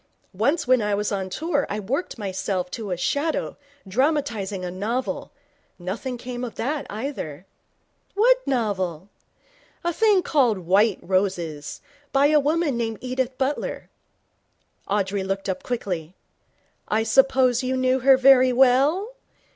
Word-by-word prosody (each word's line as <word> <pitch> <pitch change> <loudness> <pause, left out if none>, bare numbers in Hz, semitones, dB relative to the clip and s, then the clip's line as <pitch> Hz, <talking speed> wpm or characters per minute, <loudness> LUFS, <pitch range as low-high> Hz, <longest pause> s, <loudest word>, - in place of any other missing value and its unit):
Once 280 - +1
when 255 -1 +4
I 210 -1 0
was 205 +1 -2
on 190 -2 -2
tour 290 - -1
I 210 - -2
worked 255 - -3
myself 190 -3 -3
to 220 -3 -5
a 180 - -2
shadow, 290 - -1 0.3
dramatizing 225 - -1
a 180 - -4
novel. 225 +8 -3 0.5
Nothing 215 +8 -5
came 245 0 -6
of 240 - -5
that, 285 +5 -2
either.' 205 - -5 0.7
'What - - +5
novel?' 195 - -1 0.7
'A 345 0 0
thing 415 -1 +3
called 250 -9 +2
White 190 +4 +2
Roses, 175 -6 -2 0.3
by 275 +1 +4
a 305 0 +5
woman 295 -2 0
named 225 -2 -2
Edith 255 0 -3
Butler.' 270 +2 -3 1.0
Audrey 200 -1 0
looked 195 +1 -3
up 190 - -2
quickly. 180 -8 -4 0.7
'I 220 +1 +1
suppose 260 +1 +3
you 260 0 -1
knew 255 0 +2
her 265 +1 +6
very 260 -1 +6
well? 275 - +3
240 Hz, 135 wpm, -24 LUFS, 195-270 Hz, 1.0 s, her